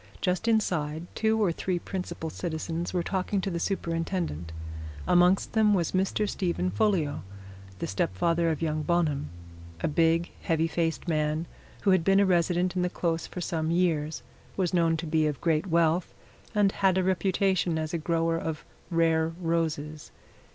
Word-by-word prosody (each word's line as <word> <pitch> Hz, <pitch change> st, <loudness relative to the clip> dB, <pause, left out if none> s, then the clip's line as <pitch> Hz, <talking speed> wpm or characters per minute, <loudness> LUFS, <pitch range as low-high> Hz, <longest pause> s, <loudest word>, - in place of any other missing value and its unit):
Just 185 Hz, +5 st, 0 dB
inside 170 Hz, -8 st, +1 dB
two 220 Hz, 0 st, +1 dB
or 200 Hz, -5 st, +3 dB
three 180 Hz, +2 st, -2 dB
principal 175 Hz, -3 st, -5 dB
citizens 165 Hz, 0 st, -3 dB
were 180 Hz, -2 st, 0 dB
talking 190 Hz, +2 st, -1 dB
to 195 Hz, -, -2 dB
the 170 Hz, -, -2 dB
Superintendent 165 Hz, -, -2 dB, 0.6 s
amongst 180 Hz, +2 st, +4 dB
them 215 Hz, -2 st, +4 dB
was 170 Hz, -4 st, 0 dB
Mr. 195 Hz, +3 st, +1 dB
Stephen 170 Hz, -, -1 dB
Folliot, 155 Hz, -, +1 dB, 0.6 s
the -, -, -3 dB
stepfather 165 Hz, -, +1 dB
of 160 Hz, 0 st, -2 dB
young 155 Hz, -1 st, 0 dB
Bonham 150 Hz, -3 st, 0 dB, 0.5 s
a -, -, +1 dB
big, 165 Hz, +2 st, +2 dB
heavy 165 Hz, 0 st, +1 dB
faced 165 Hz, +1 st, -1 dB
man 155 Hz, 0 st, 0 dB, 0.4 s
who 195 Hz, -, +4 dB
had 185 Hz, -3 st, +4 dB
been 195 Hz, +2 st, +4 dB
a 200 Hz, -, +5 dB
resident 180 Hz, 0 st, +2 dB
in 180 Hz, -, +1 dB
the 180 Hz, -, +1 dB
Close 165 Hz, -2 st, -1 dB
for 180 Hz, -, -6 dB
some 160 Hz, -2 st, -1 dB
years, 165 Hz, -3 st, 0 dB, 0.3 s
was 185 Hz, -3 st, 0 dB
known 165 Hz, -2 st, +3 dB
to 165 Hz, -, -4 dB
be 155 Hz, -1 st, +2 dB
of 145 Hz, -4 st, -3 dB
great 160 Hz, +3 st, +1 dB
wealth, 170 Hz, 0 st, +2 dB, 0.4 s
and 205 Hz, -2 st, +4 dB
had 190 Hz, -2 st, +2 dB
a 185 Hz, -, +2 dB
reputation 185 Hz, -2 st, +1 dB
as 155 Hz, 0 st, -3 dB
a 170 Hz, -, 0 dB
grower 165 Hz, 0 st, 0 dB
of 160 Hz, -2 st, -4 dB, 0.2 s
rare 165 Hz, -1 st, +2 dB
roses. 160 Hz, -3 st, -2 dB
170 Hz, 165 wpm, -28 LUFS, 160-185 Hz, 0.6 s, a